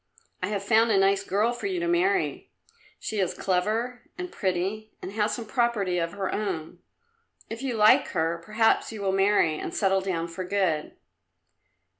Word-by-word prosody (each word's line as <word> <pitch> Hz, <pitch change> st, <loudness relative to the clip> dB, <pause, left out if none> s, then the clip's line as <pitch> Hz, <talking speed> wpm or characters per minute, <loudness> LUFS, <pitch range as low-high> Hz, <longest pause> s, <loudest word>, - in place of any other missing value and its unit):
I 185 Hz, -, 0 dB
have 200 Hz, -1 st, -2 dB
found 225 Hz, +2 st, +4 dB
a 210 Hz, -, +3 dB
nice 195 Hz, 0 st, +3 dB
girl 205 Hz, +4 st, +1 dB
for 245 Hz, -, -4 dB
you 370 Hz, -2 st, -2 dB
to 345 Hz, -, -1 dB
marry; 370 Hz, +3 st, +1 dB, 0.5 s
she 215 Hz, -, -3 dB
is 185 Hz, -3 st, 0 dB
clever 220 Hz, +7 st, -1 dB
and 360 Hz, -1 st, -5 dB
pretty, 195 Hz, +4 st, -2 dB
and 185 Hz, -, -7 dB
has 210 Hz, +1 st, 0 dB
some 235 Hz, -, -6 dB
property 215 Hz, -7 st, 0 dB
of 165 Hz, 0 st, -2 dB
her 195 Hz, -2 st, -3 dB
own. 185 Hz, -7 st, -3 dB, 0.7 s
If 225 Hz, -, -5 dB
you 265 Hz, -3 st, -2 dB
like 215 Hz, 0 st, +5 dB
her 165 Hz, +1 st, -1 dB
perhaps 220 Hz, +4 st, +2 dB
you 215 Hz, -2 st, -6 dB
will 195 Hz, -, +1 dB
marry 195 Hz, -5 st, +3 dB
and -, -, -5 dB
settle 195 Hz, -1 st, +2 dB
down 175 Hz, -3 st, -2 dB
for 170 Hz, +2 st, -6 dB
good." 180 Hz, -5 st, -1 dB
200 Hz, 175 wpm, -26 LUFS, 185-225 Hz, 0.7 s, like